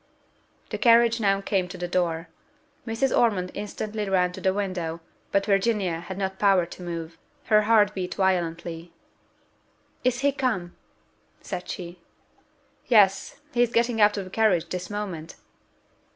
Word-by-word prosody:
The -, -, -3 dB
carriage 235 Hz, -1 st, +5 dB
now 195 Hz, -2 st, +2 dB
came 195 Hz, -2 st, 0 dB
to 180 Hz, -, -9 dB
the 175 Hz, -, -3 dB
door: 175 Hz, -2 st, -1 dB, 0.6 s
Mrs. 230 Hz, +4 st, 0 dB
Ormond 195 Hz, -6 st, +2 dB
instantly 210 Hz, 0 st, -4 dB
ran 180 Hz, -2 st, +2 dB
to -, -, -9 dB
the 190 Hz, -, +2 dB
window, 185 Hz, -4 st, -3 dB, 0.3 s
but 200 Hz, 0 st, +2 dB
Virginia 195 Hz, -4 st, +1 dB
had 175 Hz, +2 st, -7 dB
not 190 Hz, -1 st, -3 dB
power 195 Hz, -4 st, +4 dB
to 175 Hz, -, -11 dB
move 170 Hz, -2 st, -6 dB, 0.3 s
her 215 Hz, -, +7 dB
heart 210 Hz, -2 st, +5 dB
beat 185 Hz, -2 st, -4 dB
violently. 170 Hz, -3 st, -1 dB, 1.1 s
"Is 250 Hz, 0 st, +1 dB
he 285 Hz, +1 st, +3 dB
come?" 245 Hz, -11 st, -2 dB, 0.7 s
said 180 Hz, -2 st, -6 dB
she. 175 Hz, -1 st, -7 dB, 0.9 s
"Yes, 210 Hz, +3 st, +3 dB
he 240 Hz, -, +2 dB
is 240 Hz, -1 st, +3 dB
getting 235 Hz, -1 st, +1 dB
out 210 Hz, 0 st, +5 dB
of 200 Hz, -, -2 dB
the 185 Hz, -, -11 dB
carriage 185 Hz, -7 st, +2 dB
this 180 Hz, -1 st, -5 dB
moment!" 195 Hz, -6 st, -5 dB
195 Hz, 150 wpm, -25 LUFS, 175-215 Hz, 1.1 s, her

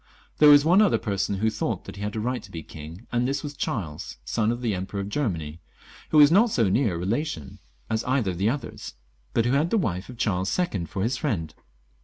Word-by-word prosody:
There 150 Hz, -, +8 dB
was 145 Hz, 0 st, +8 dB
one 180 Hz, +5 st, +6 dB
other 210 Hz, -, +4 dB
person 100 Hz, -2 st, -1 dB
who 110 Hz, +3 st, +1 dB
thought -, -, -3 dB
he 100 Hz, -, -9 dB
had 105 Hz, +1 st, -3 dB
a -, -, -1 dB
right 125 Hz, +3 st, -2 dB
to -, -, -13 dB
be 80 Hz, -2 st, -7 dB
king, 80 Hz, +9 st, -10 dB
and 120 Hz, +1 st, +1 dB
this 135 Hz, +1 st, -2 dB
was 145 Hz, -1 st, -5 dB
Charles, 85 Hz, -, -4 dB
son 110 Hz, -, +1 dB
of 120 Hz, +1 st, -4 dB
the 115 Hz, -3 st, +1 dB
Emperor 95 Hz, +2 st, -4 dB
of 100 Hz, 0 st, -4 dB
Germany, 85 Hz, -, -2 dB, 0.5 s
who 155 Hz, -, +2 dB
was 145 Hz, 0 st, +8 dB
not 215 Hz, +7 st, +5 dB
so 115 Hz, -, +2 dB
near 110 Hz, -2 st, +2 dB
a -, -, -3 dB
relation 95 Hz, -, -3 dB, 0.3 s
as 110 Hz, +1 st, -1 dB
either 125 Hz, -7 st, +1 dB
of 90 Hz, -, -7 dB
the 100 Hz, +3 st, +2 dB
others, 140 Hz, -, -5 dB, 0.4 s
but 115 Hz, -, +3 dB
who 120 Hz, -, +2 dB
had 150 Hz, +4 st, +2 dB
the 225 Hz, -, +2 dB
wife 95 Hz, -, -2 dB
of 125 Hz, -, -9 dB
Charles 95 Hz, -5 st, 0 dB
II. 140 Hz, -, -1 dB
for 95 Hz, +4 st, -3 dB
his 125 Hz, +4 st, 0 dB
friend. 85 Hz, -, -2 dB
110 Hz, 235 wpm, -25 LUFS, 95-140 Hz, 0.5 s, There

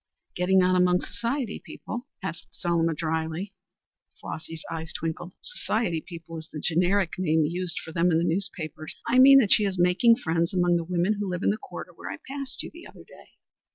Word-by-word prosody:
"Getting 185 Hz, +1 st, +3 dB
on 185 Hz, 0 st, +3 dB
among 180 Hz, 0 st, +4 dB
society 240 Hz, +1 st, -3 dB
people?" 240 Hz, +4 st, -7 dB, 0.2 s
said 190 Hz, -, -2 dB, 0.2 s
Selma 165 Hz, -2 st, 0 dB
drily. 160 Hz, +5 st, -2 dB, 0.7 s
Flossy's 160 Hz, 0 st, -6 dB
eyes 160 Hz, -1 st, -4 dB
twinkled. 165 Hz, +2 st, -4 dB
"Society 220 Hz, -, -1 dB
people 165 Hz, -1 st, -9 dB
is 160 Hz, -, -10 dB
the 155 Hz, -, -5 dB
generic 180 Hz, +3 st, +1 dB
name 160 Hz, -3 st, +3 dB
used 175 Hz, +2 st, -2 dB
for 160 Hz, -, -8 dB
them 170 Hz, +2 st, +2 dB
in 160 Hz, -, +3 dB
the 165 Hz, -, +1 dB
newspapers. 165 Hz, -3 st, -2 dB
I 245 Hz, +2 st, +4 dB
mean 275 Hz, +1 st, +10 dB
that 225 Hz, -7 st, +5 dB
she 215 Hz, -, +4 dB
is 195 Hz, -2 st, -1 dB
making 180 Hz, +7 st, +5 dB
friends 165 Hz, -2 st, -1 dB
among 175 Hz, -1 st, +3 dB
the 170 Hz, -, -2 dB
women 180 Hz, +4 st, 0 dB
who 205 Hz, -2 st, -2 dB
live 180 Hz, +1 st, -3 dB
in -, -, +4 dB
the 210 Hz, -, -2 dB
quarter -, -, -9 dB
where -, -, -8 dB
I -, -, -5 dB
passed 275 Hz, -1 st, -4 dB
you -, -, -8 dB
the 340 Hz, +1 st, -11 dB
other -, -, -14 dB
day." -, -, -17 dB
180 Hz, 195 wpm, -26 LUFS, 165-200 Hz, 0.7 s, mean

